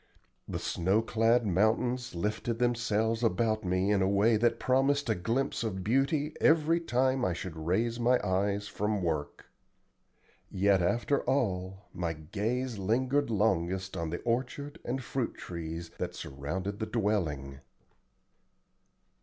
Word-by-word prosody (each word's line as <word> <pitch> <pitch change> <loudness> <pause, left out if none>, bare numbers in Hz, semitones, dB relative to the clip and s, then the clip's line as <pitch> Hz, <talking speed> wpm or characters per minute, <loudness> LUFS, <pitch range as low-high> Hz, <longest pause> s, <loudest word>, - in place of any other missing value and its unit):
The - - -3
snow 95 +6 +1
clad 115 +1 +2
mountains 110 +5 +1
lifted 105 +5 -2
themselves 115 -2 +1
about 110 +1 +1
me 95 +2 +1
in 100 -2 +3
a 95 - +2
way 105 +3 +4
that 120 +2 +2
promised 135 0 +2
a - - +4
glimpse 115 +8 -1
of 95 -4 -3
beauty 140 - +1
every 160 +1 +4
time 130 -4 +1
I 90 - +1
should 85 0 -6
raise 115 +6 +1
my 125 +1 +3
eyes 100 +2 0
from 105 -1 -1
work. 80 -4 -3 1.0
Yet 95 0 +3
after 120 +10 +1
all 95 -7 -1
my 85 -2 -2
gaze 105 +9 -3
lingered 130 +8 +1
longest 95 -3 0
on 85 -1 -2
the 85 - -4
orchard 130 +4 -2
and 130 +2 -3
fruit 125 0 -2
trees 85 -1 -6
that - - -3
surrounded 90 +9 -4
the 110 - -2
dwelling. 80 - -1
110 Hz, 135 wpm, -30 LUFS, 95-120 Hz, 1.0 s, way